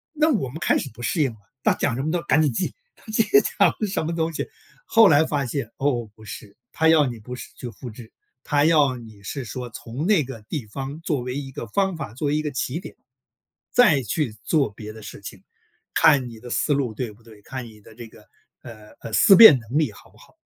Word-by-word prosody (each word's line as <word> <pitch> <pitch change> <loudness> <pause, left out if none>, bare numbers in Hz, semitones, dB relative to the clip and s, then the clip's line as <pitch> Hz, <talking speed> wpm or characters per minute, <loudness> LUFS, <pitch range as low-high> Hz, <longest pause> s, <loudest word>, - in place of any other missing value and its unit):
那 310 +1 +3
我 175 - -1
们 145 - -8
开 155 - +2
始 135 - -5
不 120 +2 -12
适 155 +6 0
应 135 - +1
了， 110 - -17 0.2
他 - - +4
讲 125 - -1
什 130 - -2
么 155 - -1
都 175 +1 0
赶 160 -2 +3
紧 145 -4 +1
记， 180 - -2 0.2
他 - - -23
讲 225 - +3
了 215 - +1
什 190 -4 -2
么 165 +2 -2
东 165 0 -1
西， - - -4 0.4
后 225 -2 +6
来 155 -1 +5
发 145 -3 -1
现， 120 -2 -4
哦， 130 -4 0
不 110 - -16
是， 100 0 -10 0.2
他 160 - +2
要 160 -2 +5
你 120 -3 -5
不 115 +4 -8
是 - - -9
去 125 - -7
复 120 +3 -9
制。 115 0 -13 0.3
他 145 +1 +2
要 150 -5 +4
你 110 -4 -13
是 130 +6 -5
说 125 +2 -6
从 120 +7 -6
那 190 -8 +3
个 120 -4 -9
地 140 -8 -4
方 135 +7 -6
作 150 -6 -1
为 125 +2 -5
一 135 -2 -5
个 135 -4 -6
方 190 - 0
法， 110 -9 -7
作 145 +4 -2
为 145 - +1
一 - - +1
个 150 - -3
起 135 +3 -3
点， - - -11 0.7
再 175 - +5
去 120 +1 -2
做 145 -8 +1
别 105 +1 -9
的 110 0 -12
事 - - -10
情， 100 -1 -10 0.5
看 140 -4 +5
你 115 -2 -12
的 120 - -10
思 145 - 0
路 135 -6 0
对 115 -2 -4
不 110 - -21
对？ 110 -2 -17
看 130 +2 -7
你 110 -2 -15
的 110 - -16
这 115 0 -10
个 110 -1 -18 0.4
呃， 110 -4 -12
呃， 115 - -8
思 195 - +7
辨 220 - +10
能 120 +5 -3
力 150 -8 +1
好 - - -17
不 - - -24
好？ - - -20
135 Hz, 265 characters per minute, -23 LUFS, 115-155 Hz, 0.7 s, 辨